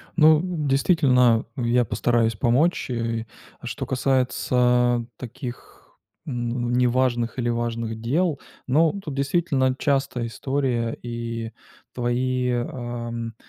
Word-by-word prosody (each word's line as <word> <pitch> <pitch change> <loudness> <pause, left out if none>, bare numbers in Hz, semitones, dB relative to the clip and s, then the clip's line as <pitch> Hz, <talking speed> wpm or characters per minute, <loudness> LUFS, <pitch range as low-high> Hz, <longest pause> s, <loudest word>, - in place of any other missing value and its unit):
Ну, 155 -2 +6 0.3
действительно, 130 -5 +3
я 120 0 +2
постараюсь 115 -2 +1
помочь. 130 - +1
Э, 115 -1 -2 0.3
а - - -12
что - - -4
касается 125 -2 +2
таких, 125 0 -9 0.3
ну, 120 -3 -2
неважных 125 -1 +1
или 120 -1 0
важных 115 -1 -2
дел. 150 +5 0 0.3
Ну, 160 +8 +3
тут 150 -6 -5
действительно 140 -2 +1
частая 135 -4 0
история, 125 -2 -1
и 115 -1 -5 0.4
твои, 125 +1 0
ам, 120 -1 -4
125 Hz, 100 wpm, -24 LUFS, 120-135 Hz, 0.4 s, Ну